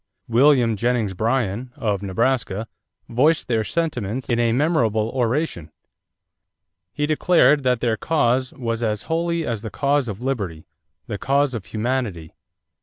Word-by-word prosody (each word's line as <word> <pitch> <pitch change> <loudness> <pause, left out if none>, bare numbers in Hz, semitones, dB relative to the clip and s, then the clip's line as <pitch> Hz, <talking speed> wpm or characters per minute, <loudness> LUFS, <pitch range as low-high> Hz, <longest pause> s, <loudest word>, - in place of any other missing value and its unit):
William 120 -1 +4
Jennings 115 -3 0
Bryan, 115 +2 -1
of 105 -9 -1
Nebraska, 110 +1 -1 0.4
voiced 145 +8 +2
their 115 -3 +1
sentiments 125 -6 -2
in 120 -1 +1
a 120 -1 +2
memorable 115 -6 +1
oration. 125 - -1 1.2
He 150 - -1
declared 150 -2 +4
that 125 -3 +1
their 115 -2 +1
cause 130 -1 +1
"was 115 -2 -3
as 105 -2 -1
holy 170 0 -1
as 115 -3 -3
the 110 - -5
cause 140 +5 +1
of 105 -2 -5
liberty 100 -12 -3 0.4
the 105 - -5
cause 140 0 +1
of 110 -5 -5
humanity." 110 -8 -3
120 Hz, 135 wpm, -22 LUFS, 110-140 Hz, 1.2 s, William